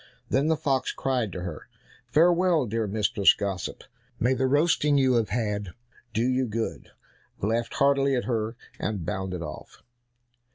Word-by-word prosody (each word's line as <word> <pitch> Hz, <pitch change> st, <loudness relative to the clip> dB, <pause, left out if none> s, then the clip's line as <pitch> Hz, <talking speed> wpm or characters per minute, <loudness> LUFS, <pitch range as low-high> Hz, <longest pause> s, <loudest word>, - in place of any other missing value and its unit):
Then 140 Hz, +3 st, +2 dB
the 160 Hz, -1 st, +2 dB
fox 140 Hz, -4 st, 0 dB
cried 125 Hz, -6 st, -1 dB
to 90 Hz, -, -6 dB
her, 85 Hz, -4 st, -7 dB, 0.4 s
"Farewell, 170 Hz, -1 st, +4 dB
dear 110 Hz, 0 st, -1 dB
Mistress 100 Hz, -1 st, +3 dB
Gossip, 95 Hz, -3 st, -4 dB, 0.4 s
may 125 Hz, +4 st, +3 dB
the 130 Hz, +1 st, +1 dB
roasting 145 Hz, 0 st, +3 dB
you 130 Hz, -2 st, +4 dB
have 115 Hz, -3 st, +1 dB
had 105 Hz, -5 st, -2 dB, 0.4 s
do 115 Hz, +3 st, +1 dB
you 130 Hz, 0 st, +1 dB
good," 110 Hz, +1 st, -4 dB, 0.5 s
laughed 115 Hz, +3 st, -1 dB
heartily 140 Hz, -1 st, +3 dB
at 125 Hz, -, 0 dB
her, 115 Hz, -2 st, -2 dB, 0.2 s
and 100 Hz, -6 st, -3 dB
bounded 95 Hz, -3 st, -3 dB
off. 75 Hz, -2 st, -9 dB
115 Hz, 150 wpm, -26 LUFS, 105-135 Hz, 0.5 s, Farewell